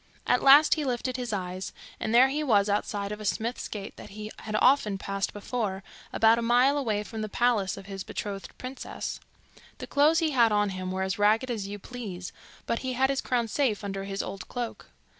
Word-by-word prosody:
At 250 - +3
last 285 +3 +8
he 310 - -1
lifted 255 -1 -2
his 245 -3 -3
eyes, 185 -2 -4 0.3
and 220 - -2
there 250 +3 +6
he 300 +3 -1
was 210 -7 +3
outside 205 0 -1
of 210 0 -5
a - - -6
smith's 225 +4 -2
gate 200 -2 -7
that - - -10
he 215 +1 -7 0.3
often 215 -6 +4
passed 195 0 -2
before, 205 -2 -3 0.3
about 225 +1 +4
a - - -1
mile 245 +4 +4
away 220 -7 0
from 220 +1 -6
the 215 - -3
palace 220 -5 +1
of 195 - -9
his 195 -1 -6
betrothed 195 -3 -5
princess. 255 +1 -6 0.6
The - - -6
clothes 295 +3 +4
he 325 -2 +2
had 235 -5 +4
on 205 -1 +2
him 185 -1 -4
were 190 0 -1
as 190 +1 -2
ragged 220 +5 +3
as 210 -4 -3
you 205 +1 -5
please, 200 -5 -7 0.3
but 230 - -1
he 260 -1 -3
had 265 +2 +2
his 270 - -1
crowns 235 -3 -1
safe 235 -8 +1
under 195 -1 -4
his 195 0 -3
old 195 -2 -7
cloak. 245 -2 -5
220 Hz, 210 wpm, -28 LUFS, 200-250 Hz, 0.6 s, last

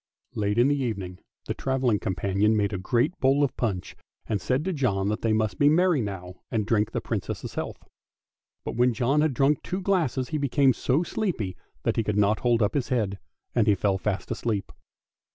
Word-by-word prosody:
Late 105 0 -1
in 120 +2 +5
the 145 -1 +1
evening 95 -7 -4 0.3
the - - -2
travelling 130 -5 0
companion 100 +4 +1
made 105 0 0
a 95 - -2
great 120 - +1
bowl 135 +2 +3
of 140 - 0
punch, 100 -7 -2 0.3
and 105 -4 -2
said 130 - 0
to 190 - -1
John 100 - 0
that 105 - -2
they 115 - +1
must 110 -1 0
be 145 - +6
merry 170 -2 +3
now 90 -3 -6
and 110 -2 -1
drink 105 -1 +1
the - - -2
Princess' - - -4
health. - - -5 0.8
But - - -4
when 120 0 +3
John 135 +6 +2
had 150 -4 +1
drunk 140 +3 +3
two 185 - -3
glasses 170 -10 0
he 155 - -1
became 140 -1 +3
so 135 +8 +1
sleepy 165 - -2 0.3
that - - 0
he 115 - +2
could 105 -1 -1
not 105 +1 +3
hold 120 -2 +2
up 105 - +1
his 135 -5 -1
head, 105 -6 0 0.3
and 115 -3 +2
he 105 - +5
fell 95 0 0
fast 100 0 -2
asleep. 105 -5 -2
115 Hz, 205 wpm, -26 LUFS, 100-135 Hz, 0.8 s, be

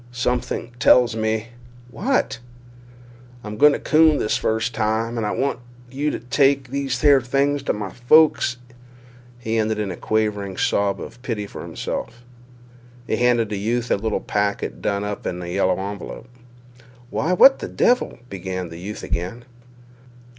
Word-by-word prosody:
"Something 125 0 -2
tells 120 0 +5
me—" 110 0 -1 0.4
"What?" 240 - 0 1.0
"I'm 105 - -6
a - - -6
gone 150 +6 +5
coon 155 -1 +4
this 105 - 0
first 110 +2 -1
time 110 +1 0
and—and 115 -2 -2
I - - -1
w 135 - 0
want 140 - -2 0.3
you 145 +3 -1
to - - -3
take 135 +2 +2
these 135 -1 -2
here 145 -3 +6
things—to—my—folks." 135 +1 +2 0.8
He 115 -2 -2
ended 110 0 0
in 105 -3 -2
a - - -5
quavering 105 -3 -1
sob 100 -1 +1
of 125 - -9
pity 115 -5 -3
for - - -9
himself. 120 - -5 0.8
He - - -1
handed 120 -3 +2
the 105 -2 -3
youth 120 +4 -1
a - - +5
little 110 +2 -2
packet 100 -12 -2
done 100 +6 -1
up 105 0 -4
in 90 - -3
a 90 - -6
yellow 95 0 +1
envelope. 100 +4 -6 0.8
"Why, 165 +5 0
what 270 +9 +7
the - - -5
devil—" 250 +1 +1
began 95 -3 -5
the 85 0 -9
youth 105 +4 -7
again. 95 +8 -4
115 Hz, 155 wpm, -22 LUFS, 105-130 Hz, 1.0 s, what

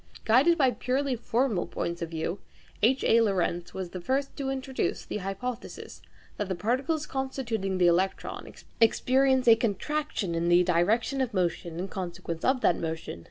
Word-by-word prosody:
Guided 270 +10 +5
by 265 -5 +4
purely 265 +2 -1
formal 235 -4 0
points 170 +1 -4
of 170 - -3
view, 165 +3 -3 0.4
H. 255 +5 +3
A. 230 - +5
Lorentz 180 -4 0
was 185 -2 -5
the 185 - -6
first 270 +8 -1
to 275 -1 -2
introduce 265 -1 -2
the - - -4
hypothesis 210 +5 -6 0.4
that 205 -2 -3
the 190 - -1
form 225 +8 0
of 270 - -11
the 265 - -1
electron 185 +3 0 0.3
experiences 260 +3 +3
a 230 - +9
contraction 230 - -2
in 170 +1 0
the 175 +1 +6
direction 205 +10 +1
of 245 -5 -2
motion 170 -2 -1
in 185 +2 -3
consequence 175 -3 -5
of 260 -1 +2
that 175 - +3
motion. 160 - -4
215 Hz, 160 wpm, -28 LUFS, 175-260 Hz, 0.4 s, a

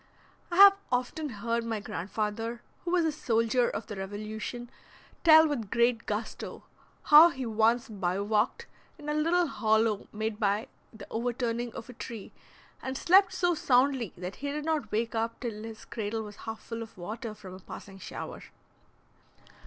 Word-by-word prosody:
I 345 - -3
have 395 +1 +10 0.2
often 255 +5 -1
heard 230 +1 -2
my 225 -2 -2
grand 195 -2 -6
father, 225 +3 -3 0.2
who 350 - -3
was 355 -2 +3
a 320 - +2
soldier 235 -3 +1
of 205 - -4
the 210 - -7
Revolution, 215 +5 -6 0.5
tell 315 -1 +8
with 240 -9 -3
great 235 +1 +2
gusto 215 +2 -4 0.4
how 305 +3 +9
he 265 -5 -5
once 230 +3 +2
bivouacked 200 +1 0 0.3
in 295 0 -7
a - - +1
little 335 +4 +2
hollow 220 -6 +1
made 220 0 -3
by 210 +4 0 0.2
the 220 -3 -11
overturning 235 0 -2
of 225 - -7
a 250 - -10
tree, 225 -3 -8 0.5
and 260 0 -4
slept 380 +6 +5
so 350 -1 +1
soundly 260 - +2
that 180 +2 -6
he 285 0 -3
did 300 +1 -4
not 315 -3 -1
wake 225 +2 -1
up 230 0 -2
till 225 -4 -5
his 225 0 -9
cradle 220 0 -3
was 210 -1 -10
half 225 0 -6
full 230 0 -6
of 225 -3 -9
water 215 +5 -6
from 195 -3 -11
a 185 - -9
passing 195 +1 -10
shower. - - -7
230 Hz, 170 wpm, -29 LUFS, 215-265 Hz, 0.5 s, have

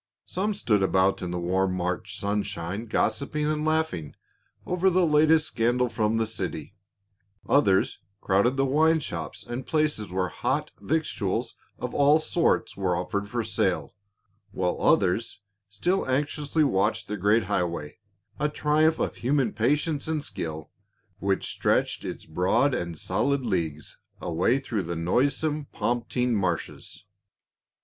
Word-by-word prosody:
Some 205 +3 -1
stood 105 - +1
about 95 0 +2
in 90 - -3
the 90 0 -3
warm 95 +2 0
March 90 0 -3
sunshine 100 0 -2
gossiping 140 +8 0
and 150 0 0
laughing 155 - -1 0.5
over 180 +1 +2
the 185 0 +3
latest 155 0 +4
scandal 120 -1 +1
from 110 -1 0
the 115 - +1
city, 95 -6 -4 0.7
others 100 -9 +3 0.2
crowded 100 +9 +2
the 135 - +3
wine 160 +4 +3
shops 85 - -6
and 120 +2 -5
places 150 -9 0
where 90 -1 0
hot - - -2
victuals 120 -7 -1 0.2
of 125 - -5
all 145 +2 +5
sorts 165 +1 +1
were 95 -3 0
offered 95 +3 -3
for 120 +1 -1
sale, 100 -4 -1 0.6
while 90 -1 -2
others 100 +3 +2 0.3
still 175 - 0
anxiously 145 +3 0
watched 95 -9 +1
the 105 - -3
great 105 +3 +3
highway, 90 -5 -2 0.4
a 150 +1 +1
triumph 155 +2 +2
of - - -2
human 130 -2 +1
patience 145 +7 0
and 155 -2 -1
skill, 80 - -5 0.5
which 95 -1 0
stretched - - 0
its - - -6
broad 90 - +2
and 85 -7 -3
solid 130 - 0
leagues 80 -8 -3 0.2
away 90 +10 +1
through 125 -6 -2
the 85 -1 -4
noisome 140 - +1
Pomp 120 -3 -2
tine 125 -1 +1
marshes. 95 0 -3
115 Hz, 140 wpm, -26 LUFS, 95-145 Hz, 0.7 s, all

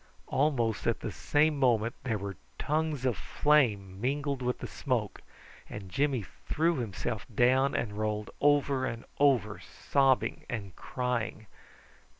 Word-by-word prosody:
Almost 130 -6 +1
at - - +1
the - - -3
same 150 0 +2
moment 120 -3 +3
there 115 -4 0
were 100 -1 -5 0.2
tongues 150 -3 -1
of 125 -4 +2
flame 105 -13 +1
mingled 140 +1 -1
with 125 0 -1
the - - -6
smoke, 120 -6 -2 0.5
and 100 -3 -8
Jimmy 135 -1 +1
threw 160 - -1
himself 110 -1 -3
down 130 +4 +3
and 105 -3 -1
rolled 105 0 -2
over 145 -2 +3
and 115 -1 -5
over, 125 -8 +3
sobbing 135 -2 +1
and 100 -6 -5
crying. 120 -3 -3
125 Hz, 135 wpm, -30 LUFS, 110-140 Hz, 0.5 s, moment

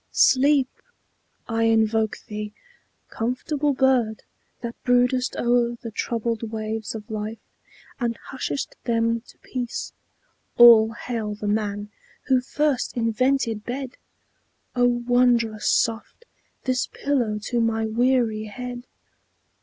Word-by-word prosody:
Sleep! 275 0 +4 0.8
I 225 -1 +1
invoke 220 -1 +2
thee, 210 0 -5 0.6
"comfortable 275 +5 -1
bird, 255 -5 +2 0.4
That 235 -1 -4
broodest 250 +1 +2
o'er 240 0 +2
the 230 - -7
troubled 230 0 -2
waves 220 0 -4
of 220 0 -8
life, 215 +1 -4 0.6
And 235 -2 -1
hushest 270 +1 -4
them 230 -1 +1
to - - -17
peace." 250 -2 -4 0.6
All 230 -2 +8
hail 225 -3 -4
the 210 0 -5
man 205 0 -1 0.3
Who 260 -1 +2
first 280 -1 -1
invented 230 -1 +1
bed! 260 +2 -5 0.8
O, 245 0 +3
wondrous 240 -2 +2
soft 230 - 0 0.4
This 255 -1 0
pillow 245 -7 -1
to 240 +1 0
my 225 -1 +1
weary 230 -1 +1
head! 245 +3 -7
235 Hz, 110 wpm, -24 LUFS, 220-250 Hz, 0.8 s, All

